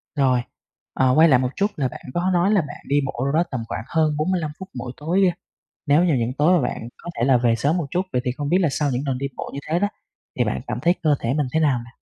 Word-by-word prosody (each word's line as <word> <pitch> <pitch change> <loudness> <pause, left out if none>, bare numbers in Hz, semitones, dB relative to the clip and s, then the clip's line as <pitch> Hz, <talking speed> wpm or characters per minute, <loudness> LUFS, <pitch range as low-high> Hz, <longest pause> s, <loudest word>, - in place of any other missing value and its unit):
Rồi. 130 -4 +3 0.5
Ờ, 130 -1 +3
quay 160 +2 +7
lại 130 -4 +5
một 125 0 0
chút 200 - +2
là 135 -3 0
bạn - - -9
có 175 +2 0
nói 180 +3 +3
là 205 -3 +4
bạn 145 -1 -8
đi 145 +1 +3
bộ 135 - -4
đâu 140 - 0
đó 165 +2 +4
tầm 125 -4 -3
khoảng 110 - -4
hơn 155 0 +1
45 160 -1 0
phút 190 0 -8
mỗi 125 -1 -5
tối. 180 +5 +2 0.6
Nếu 150 +4 +4
như 170 -4 +3
những 120 -1 0
tối 175 +5 +5
mà - - -1
bạn 115 - -6
có 175 - -8
thể 120 - +2
là 130 0 +5
về 120 -1 +2
sớm 140 +9 +1
một 170 -5 -1
chút, 180 - +1
vậy 125 - +1
thì 125 - 0
không 145 +3 -4
biết 180 - +3
là 175 - +3
sau 145 +1 0
những 125 0 -1
lần 130 -2 -1
đi 140 - -2
bộ - - -5
như - - -4
thế 165 +2 +1
đó 205 +2 +1 0.5
thì - - +3
bạn - - -2
cảm - - -3
thấy 175 +1 +3
cơ 155 -3 +4
thể 115 +3 -1
mình 150 -2 0
thế 160 - +2
nào 145 -5 +3
nè? 120 - -14
145 Hz, 295 wpm, -22 LUFS, 130-170 Hz, 0.6 s, quay